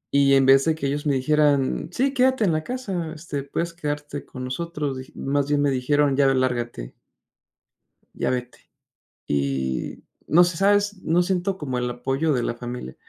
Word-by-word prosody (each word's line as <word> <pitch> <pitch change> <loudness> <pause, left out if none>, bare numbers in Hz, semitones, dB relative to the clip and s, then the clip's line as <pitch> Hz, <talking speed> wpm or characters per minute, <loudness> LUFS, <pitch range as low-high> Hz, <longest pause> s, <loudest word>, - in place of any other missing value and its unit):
Y 140 -1 +5
en 135 -1 +4
vez 135 0 +6
de 160 -1 +2
que 155 - -5
ellos 145 +2 -2
me 140 - +2
dijeran: 145 +1 +2
"Sí, 270 +8 0
quédate 260 -2 +3
en 190 - +3
la 155 0 -1
casa, 190 -11 -4
este, 150 -3 -5
puedes 170 +5 -3
quedarte 145 -3 -4
con 130 - -8
nosotros", 150 +1 -3
dij 130 0 -9
más 140 0 -1
bien 145 -1 +2
me 140 - +2
dijeron: 140 +2 +2
"Ya, 140 0 +4
lárgate" 120 - -2 1.2
"ya - - -1
vete". 125 -1 -5 0.6
Y 70 -2 -2 0.2
no 175 +3 +6
sé, 175 -1 -1
¿sabes? 205 +1 +2
No 170 +2 +2
siento 190 +1 -1
como 130 -7 -3
el 125 0 -1
apoyo 135 +5 -1
de 125 - 0
la 120 - -2
familia. 120 - -7
145 Hz, 180 wpm, -24 LUFS, 130-170 Hz, 1.2 s, vez